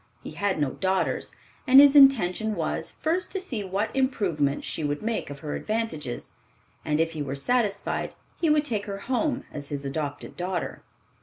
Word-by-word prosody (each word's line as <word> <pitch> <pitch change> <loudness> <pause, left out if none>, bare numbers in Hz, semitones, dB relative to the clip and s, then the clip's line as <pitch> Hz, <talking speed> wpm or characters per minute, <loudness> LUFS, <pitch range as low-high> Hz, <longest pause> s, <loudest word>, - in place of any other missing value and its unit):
He - - -7
had 200 -1 -1
no 145 -3 0
daughters, 190 0 -1 0.3
and 265 +1 +9
his 285 0 +8
intention 220 -7 +5
was, - - -2
first 345 +4 0
to 385 - -1
see 255 - -4
what 195 +5 -2
improvement 185 - 0
she - - -3
would 145 +3 -2
make 225 -7 -2
of 140 -1 -8
her 150 -2 -4
advantages, 215 - -3 0.5
and 150 0 0
if 165 0 +2
he 155 -2 -5
were 140 -1 -3
satisfied, 205 - -1 0.3
he 330 - +3
would 300 0 +3
take 215 -7 -1
her 200 -1 -4
home 260 +5 -1
as 145 -1 -6
his 145 -1 -4
adopted 145 +1 -4
daughter. 180 0 -3
200 Hz, 175 wpm, -26 LUFS, -, 0.5 s, and